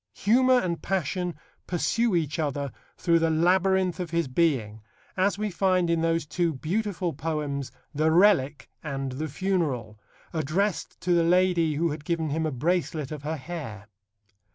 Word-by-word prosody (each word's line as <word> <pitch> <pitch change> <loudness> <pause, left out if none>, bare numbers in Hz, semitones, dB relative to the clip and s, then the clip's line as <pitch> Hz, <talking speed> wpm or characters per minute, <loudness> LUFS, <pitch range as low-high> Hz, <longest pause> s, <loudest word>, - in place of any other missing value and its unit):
Humour 255 +4 +4
and 170 -6 -2
passion 180 -1 -1 0.3
pursue 215 +4 +1
each 160 -2 -1
other 140 -3 -2 0.3
through 170 -1 +3
the 165 0 +2
labyrinth 185 +3 +2
of 180 -2 -3
his 170 -2 0
being, 130 -7 0 0.3
as 195 +1 +1
we 210 0 -2
find 185 -1 +2
in 165 -1 +1
those 165 -1 +1
two 165 +1 -1
beautiful 180 +3 -2
poems, 145 -2 -3 0.2
The 155 +2 +2
Relic 160 -6 +3
and 135 -3 -4
The 150 +5 -3
Funeral, 145 - -2 0.3
addressed 170 +3 -1
to 180 - +1
the 170 -1 +4
lady 175 -2 +3
who 165 +2 +1
had 145 0 -6
given 160 -2 -1
him 160 +1 0
a - - -2
bracelet 155 +1 -1
of 150 -2 -5
her 155 +2 -3
hair. 130 - -7
165 Hz, 155 wpm, -26 LUFS, 150-180 Hz, 0.3 s, Humour